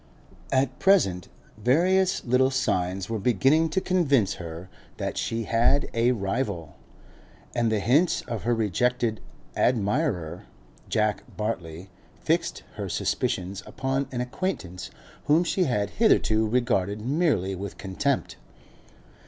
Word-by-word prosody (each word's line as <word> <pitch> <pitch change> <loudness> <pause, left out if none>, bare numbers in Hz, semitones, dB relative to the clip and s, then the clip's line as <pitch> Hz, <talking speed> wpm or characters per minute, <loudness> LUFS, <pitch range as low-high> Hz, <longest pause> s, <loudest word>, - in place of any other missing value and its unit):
At 130 -1 +1
present, 95 - +3 0.3
various 180 - +2
little 130 +2 +3
signs 95 -8 -1
were 115 -1 -2
beginning 135 +9 +3
to 170 - +1
convince 140 - +2
her 85 +1 -7 0.3
that - - -3
she 115 0 -2
had 115 +6 +2
a 115 +2 +3
rival, 100 - -3 0.8
and 120 -2 +1
the 110 - +1
hints 145 - +3
of 115 -4 -5
her 120 +2 +1
rejected 115 +2 0 0.3
admirer, 105 - 0 0.4
Jack 105 -2 +1 0.2
Bartley, 90 -4 -4 0.3
fixed - - -1
her - - -4
suspicions 95 +2 -2
upon 135 +1 -2
an 125 -1 -2
acquaintance 125 - -4 0.4
whom 155 +4 +4
she 180 +1 +1
had 105 -7 0
hitherto 110 - +3
regarded 110 -4 0
merely 130 - +1
with 95 +1 -6
contempt. 105 - -2
115 Hz, 120 wpm, -26 LUFS, 95-135 Hz, 0.8 s, whom